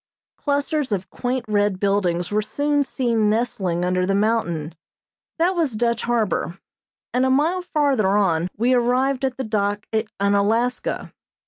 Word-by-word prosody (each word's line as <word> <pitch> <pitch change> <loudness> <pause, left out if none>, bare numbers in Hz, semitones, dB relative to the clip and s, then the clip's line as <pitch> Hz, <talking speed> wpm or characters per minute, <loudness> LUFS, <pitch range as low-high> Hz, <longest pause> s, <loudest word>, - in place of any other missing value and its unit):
Clusters 285 -1 -1
of 190 -2 -2
quaint 250 0 -2
red 205 -2 +1
buildings 185 -3 0
were 210 +1 +2
soon 290 +7 0
seen 235 -6 +1
nestling 195 -6 0
under 180 0 +1
the 195 +2 +1
mountain 195 -7 0 0.6
that 350 +3 +2
was 320 -8 0
Dutch 235 +1 0
Harbor, 220 -6 -1 0.6
and 250 - +2
a 260 - +2
mile 310 +8 +2
farther 285 - +1
on 190 -4 +2
we 240 +4 +2
arrived 255 +2 +1
at 260 -1 -1
the 265 - -2
dock 205 -2 -1
at 220 0 0
Unalaska. 205 +5 0
225 Hz, 145 wpm, -22 LUFS, 200-260 Hz, 0.6 s, were